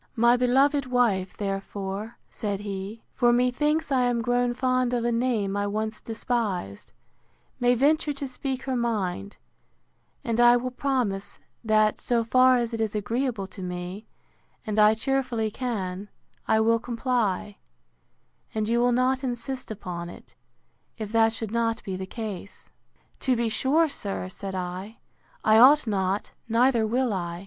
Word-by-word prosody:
My 235 +1 +5
beloved 265 +3 +3
wife, 225 -7 +1
therefore, 195 +2 -4
said 205 -2 -4
he, 200 +2 -6
for 240 -2 +3
methinks 280 +6 +1
I 260 -2 +3
am 245 -1 +1
grown 245 +1 +1
fond 255 0 +1
of 235 -1 -1
a 240 - +2
name 230 -5 0
I 205 0 0
once 215 +1 -3
despised, 220 - -3 0.7
may 245 0 +3
venture 295 +4 +2
to 280 -1 -4
speak 260 0 -4
her 265 -1 -2
mind; 205 -5 -2 0.9
and 230 -3 -1
I 240 0 +7
will 255 +1 -3
promise, 245 -7 -2 0.3
that, 215 -1 +2
so 235 -1 +1
far 255 +2 +5
as 235 -1 -2
it 225 - -2
is 220 -1 -1
agreeable 225 0 -1
to 190 - -10
me, 180 +3 -6 0.6
and 215 0 -1
I 215 +1 +6
cheerfully 245 -3 -1
can, 205 -5 -4 0.4
I 220 - +3
will 230 +1 +3
comply; 230 -4 -1 1.0
and 215 -1 0
you 235 +1 +2
will 245 +1 +3
not 255 +2 +1
insist 255 +1 -4
upon 180 -5 -6
it, - - -13 0.6
if 215 -2 -5
that 225 0 +4
should 225 -2 -5
not 230 -1 0
be 190 - -4
the 190 0 -5
case. 205 -3 -7 0.5
To 260 -2 +1
be 235 -1 0
sure, 290 +8 +2
sir, 200 -9 -4
said 190 0 -6
I, 185 +4 -5 0.5
I 220 0 +5
ought 280 +5 +7
not, 195 -2 -1 0.2
neither 230 -1 +3
will 245 0 +1
I. 175 -2 -3
230 Hz, 155 wpm, -26 LUFS, 205-250 Hz, 1.0 s, I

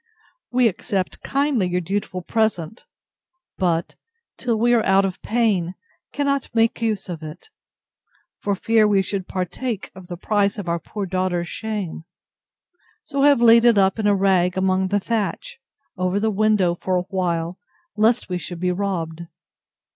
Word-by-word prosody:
We 250 -1 +4
accept 190 -2 -2
kindly 275 -9 0
your 180 0 0
dutiful 185 0 -3
present; 220 -2 -1 0.7
but, 170 -3 0 0.4
till 235 -3 -1
we 240 +2 +3
are 230 -2 +3
out 195 +1 +4
of 190 -1 -4
pain, 205 -7 0 0.4
cannot 280 -2 -1
make 225 +1 +2
use 215 -4 -1
of 170 -3 -6
it, 155 - -10 0.9
for 200 -1 -1
fear 220 +2 +3
we 200 -2 +3
should 190 -1 -4
partake 195 +4 -4
of 185 -1 -12
the 175 -1 -6
price 200 +2 +1
of 200 -4 -6
our 170 0 0
poor 200 +5 -5
daughter's 180 -2 -1
shame: 205 -7 -5 1.0
so 280 -2 -2
have 285 -3 +5
laid 230 0 +7
it 235 -3 +5
up 195 +2 +3
in 210 - +1
a 205 - +4
rag 190 -2 +2
among 190 0 +1
the 205 +2 +1
thatch, 230 - -3 0.4
over 185 +1 0
the 220 +1 +1
window, 205 -4 +2
for 185 +1 -2
a 180 - 0
while, 175 -2 -2 0.4
lest 225 +3 +2
we 180 -1 -2
should 175 +1 -6
be 180 +1 0
robbed. 170 -3 -3
195 Hz, 160 wpm, -22 LUFS, 180-220 Hz, 1.0 s, laid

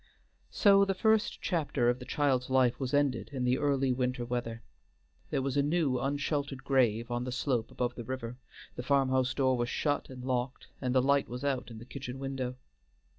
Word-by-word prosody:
So 200 -2 +5
the 195 -1 0
first 220 +2 +1
chapter 150 -8 0
of 120 +1 +2
the 125 - -8
child's 135 -4 +1
life 130 -2 +3
was 130 -2 -2
ended 145 -4 +1
in 130 -3 -3
the 125 +1 +2
early 135 -2 +2
winter 125 -1 -1
weather. 120 -2 -4 0.7
There 135 - 0
was 135 0 -2
a 140 - +4
new 145 -3 +1
unsheltered 140 0 -2
grave 120 -4 +2
on 120 0 -1
the 125 - -4
slope 125 -2 -1
above 125 -1 -2
the 120 - -7
river, 125 -1 -5 0.4
the - - -4
farm 135 +1 +2
house 130 -1 +1
door 130 -2 +2
was 120 0 -1
shut 145 -2 -1
and 125 -1 -9
locked, 125 0 -2
and 125 -1 -1
the 130 - +4
light 140 +1 +2
was 125 +3 -6
out 135 -4 -1
in 115 - -9
the 115 - -10
kitchen 130 -1 -7
window. 135 -2 -3
130 Hz, 200 wpm, -31 LUFS, 125-140 Hz, 0.7 s, So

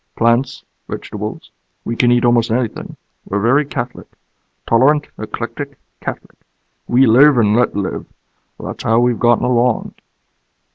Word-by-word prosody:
"Plants. 120 +3 +1 0.2
Vegetables. - - -7 0.3
We 115 - -3
can 120 0 +3
eat 120 0 +3
almost 120 -1 +3
anything. 115 0 -3 0.3
We're 100 - -2
very 130 +8 +2
catholic. 125 -3 -6 0.6
Tolerant, 145 +6 +3
eclectic, - - -6 0.2
catholic. - - -7 0.5
We 130 +2 +4
live 130 +5 +6
and 105 -2 +3
let 125 - +1
live. 100 -2 -3 0.5
That's - - -7
how 115 +1 +3
we've 120 -1 +1
gotten 120 -1 +3
along." 125 -1 +1
120 Hz, 130 wpm, -17 LUFS, 115-125 Hz, 0.6 s, live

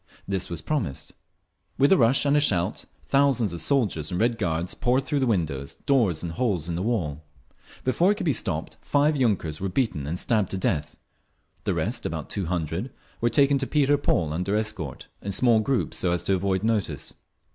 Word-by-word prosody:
This 95 -1 -2
was 85 -2 -4
promised. 100 - -2 0.6
With 140 +2 +4
a - - +8
rush 125 +3 +4
and 140 0 +3
a - - +5
shout 95 -12 +1 0.2
thousands 135 -8 +2
of 85 - -3
soldiers 105 - +1
and 90 - -2
Red 115 0 +1
Guards 85 -2 -1
poured 125 +2 +1
through 145 +1 -1
windows, 80 - -1
doors 110 - +2
and 85 - -3
holes 90 -4 -1
in 85 - -2
the 85 - -2
wall. 85 -9 -1 0.6
Before 170 +9 +3
it - - +1
could 200 -3 -4
be 150 - +3
stopped 80 -7 -4
five 150 +2 +2
yunkers 100 - 0
were 95 - -1
beaten 90 - -1
and 85 +4 -2
stabbed 105 -1 +1
to 95 - -2
death. 75 -5 -1 0.7
The - - 0
rest, - - -2
about - - -5
two 95 -4 -2
hundred, 85 - -2 0.3
were 120 - +3
taken 140 +1 +3
to 135 - -2
Peter 145 -1 +3
Paul 85 - 0
under 90 +5 -1
escort, 105 -10 -3
in 100 - -4
small 115 +2 +4
groups 125 +3 -1
so 90 - +1
as 90 - -1
to 95 - +1
avoid 95 0 0
notice. 105 - -1
100 Hz, 195 wpm, -25 LUFS, 85-130 Hz, 0.7 s, a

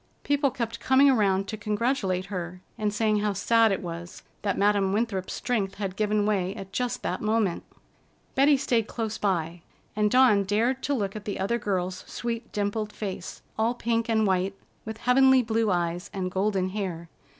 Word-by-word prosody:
People 285 -1 +2
kept 235 -3 -4
coming 270 +1 +5
around 195 -5 +2
to 215 - -4
congratulate 210 -3 -1
her, 180 0 -5
and 210 -1 -1
saying 215 0 +1
how 205 0 0
sad 225 +3 +3
it 195 - -2
was 170 +1 -7 0.2
that 200 - -1
Madam 200 -1 +2
Winthrop's 205 -4 -1
strength 205 -6 -1
had 195 -2 -4
given 210 0 +1
way 195 -2 0
at 195 -2 -9
just 250 +2 -2
that - - -2
moment. 215 -4 0 0.7
Betty 280 +1 +5
stayed 230 -4 +1
close 225 -2 -4
by, 170 -4 -1 0.3
and 210 0 +2
Dawn 245 -4 +5
dared 230 +7 +1
to 285 - 0
look 200 -4 -2
at 210 - -7
the 205 - -4
other 220 +5 0
girl's 185 -3 -2
sweet 235 -1 -4
dimpled 210 +1 -2
face, 195 -5 -6 0.2
all 230 +2 +2
pink 230 -1 -1
and 220 -1 +3
white, 190 0 +1 0.3
with 220 0 -6
heavenly 260 +1 +5
blue 225 -1 +1
eyes 175 -1 -1
and 185 -2 -3
golden 190 -1 0
hair. 185 -4 -4
210 Hz, 175 wpm, -26 LUFS, 190-230 Hz, 0.7 s, coming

